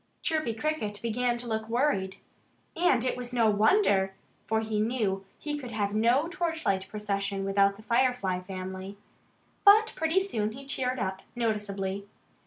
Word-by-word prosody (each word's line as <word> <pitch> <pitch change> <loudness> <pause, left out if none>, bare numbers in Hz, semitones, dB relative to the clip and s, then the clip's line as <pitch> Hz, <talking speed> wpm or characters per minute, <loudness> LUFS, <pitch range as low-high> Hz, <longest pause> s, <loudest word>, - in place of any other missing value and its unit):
Chirpy 310 -8 0
Cricket 220 -6 -2
began 240 +1 0
to 240 - -7
look 220 -1 -2
worried. 225 -7 +1 0.6
And 325 -8 +3
it 255 - 0
was 245 0 -6
no 230 -3 +4
wonder. 205 - +3 0.3
For 220 0 +1
he 220 -1 -2
knew 215 -4 0
he 295 -1 -4
could 255 -4 -7
have 205 -3 -1
no 240 +8 +3
torchlight 325 - -1
procession 200 -2 -2
without 195 0 +3
the 210 - -14
Firefly 235 -6 +1
family. 190 +1 -7 0.7
But 435 +2 +7
pretty 320 +4 +2
soon 220 - -2
he 275 +3 -10
cheered 260 -2 -2
up 190 -4 -3
noticeably. 200 -4 -2
220 Hz, 150 wpm, -28 LUFS, 200-260 Hz, 0.7 s, But